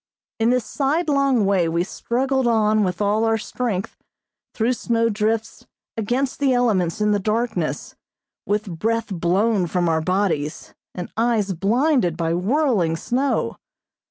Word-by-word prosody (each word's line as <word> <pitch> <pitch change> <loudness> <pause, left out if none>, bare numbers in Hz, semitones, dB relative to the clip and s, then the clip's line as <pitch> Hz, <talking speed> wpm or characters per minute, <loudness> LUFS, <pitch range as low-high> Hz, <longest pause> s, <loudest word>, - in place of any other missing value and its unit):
In 225 +1 +3
this 250 -2 +1
sidelong 275 - +1
way 190 -4 +2
we 170 +1 0
struggled 260 +6 -1
on 215 -2 +3
with 180 0 -2
all 210 +2 +1
our 225 0 +2
strength, 220 -4 -3 0.6
through 235 +2 +1
snow 230 -1 0
drifts, 220 +1 -2 0.3
against 245 +5 -1
the 275 -2 +2
elements 210 -8 +1
in 210 0 +3
the 205 - +2
darkness, 225 +4 -2 0.5
with 205 -5 -2
breath 230 +2 0
blown 185 +3 +1
from 175 +1 0
our 160 -1 +1
bodies, 170 -4 -1 0.2
and 180 - -6
eyes 225 -4 +1
blinded 215 - +1
by 165 -1 0
whirling 200 - +1
snow. 260 +10 -1
215 Hz, 135 wpm, -22 LUFS, 185-245 Hz, 0.6 s, In